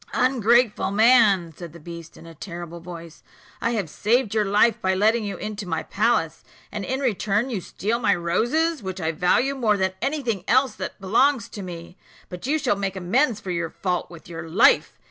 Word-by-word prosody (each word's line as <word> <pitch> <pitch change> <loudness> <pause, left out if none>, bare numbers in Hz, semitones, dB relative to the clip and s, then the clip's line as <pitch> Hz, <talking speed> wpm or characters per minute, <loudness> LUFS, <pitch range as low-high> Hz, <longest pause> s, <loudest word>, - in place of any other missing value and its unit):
"Ungrateful 240 -2 +2
man!" 205 -5 +4
said 170 -1 -9
the 170 - -12
beast, 170 0 -10
in - - -14
a 165 - -11
terrible 170 +1 -8
voice, 170 -1 -10 0.4
"I 230 - 0
have 205 -7 -1
saved 220 - 0
your 215 -1 +1
life 210 +4 +3
by 190 0 +1
letting 220 +4 +2
you 200 -1 -4
into 210 -2 -6
my 165 -2 -2
palace, 205 -7 0 0.3
and 210 - -4
in 260 +7 -3
return 220 0 0
you 205 -6 -2
steal 220 +6 -3
my 230 - +2
roses, 240 - 0
which 190 -1 -5
I 160 -2 -1
value 180 - +1
more 225 -6 +1
than 190 -1 0
any 280 +2 -1
thing 220 -7 -2
else 260 +2 +3
that - - -6
belongs 230 +5 +2
to 205 - -8
me. 175 -1 -9 0.3
But 180 +6 -7
you 305 +3 +2
shall 265 - 0
make 195 -1 -3
amends 215 +6 +1
for 195 -3 -6
your 170 -1 -2
fault 180 0 -3
with 170 -2 -13
your 165 -1 -8
life. 195 +9 +4
200 Hz, 200 wpm, -23 LUFS, 175-235 Hz, 0.4 s, man